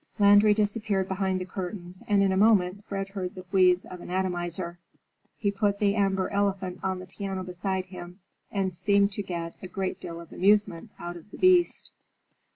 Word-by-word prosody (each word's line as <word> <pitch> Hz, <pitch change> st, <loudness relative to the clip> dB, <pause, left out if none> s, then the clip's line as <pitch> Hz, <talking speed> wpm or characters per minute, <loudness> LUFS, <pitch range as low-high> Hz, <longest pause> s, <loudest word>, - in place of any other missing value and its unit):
Landry 205 Hz, 0 st, +6 dB
disappeared 205 Hz, -2 st, 0 dB
behind 190 Hz, -1 st, -1 dB
the 185 Hz, -, -4 dB
curtains 185 Hz, -1 st, -6 dB
and 205 Hz, -1 st, +4 dB
in 195 Hz, -, +3 dB
a -, -, +1 dB
moment 200 Hz, -1 st, +3 dB
Fred 195 Hz, -1 st, -4 dB
heard 190 Hz, -2 st, -5 dB
the 185 Hz, -1 st, -9 dB
wheeze 185 Hz, -1 st, +4 dB
of 180 Hz, -1 st, -9 dB
an -, -, -9 dB
atomizer. 175 Hz, -1 st, -2 dB, 0.6 s
He 200 Hz, -2 st, 0 dB
put 200 Hz, 0 st, 0 dB
the 200 Hz, -1 st, +2 dB
amber 195 Hz, -2 st, +1 dB
elephant 195 Hz, -2 st, -1 dB
on 190 Hz, -1 st, -1 dB
the 185 Hz, -, -8 dB
piano 190 Hz, 0 st, -5 dB
beside 185 Hz, +1 st, -3 dB
him 180 Hz, 0 st, -10 dB, 0.3 s
and 190 Hz, -2 st, -1 dB
seemed 200 Hz, +3 st, +3 dB
to 200 Hz, -, -3 dB
get 170 Hz, -3 st, -5 dB
a 185 Hz, -, -6 dB
great 190 Hz, 0 st, -3 dB
deal 170 Hz, 0 st, -6 dB
of 170 Hz, -1 st, -12 dB
amusement 200 Hz, -3 st, +2 dB
out 175 Hz, 0 st, -6 dB
of 170 Hz, +4 st, -15 dB
the -, -, -11 dB
beast. 365 Hz, -2 st, +3 dB
190 Hz, 185 wpm, -27 LUFS, 180-200 Hz, 0.6 s, Landry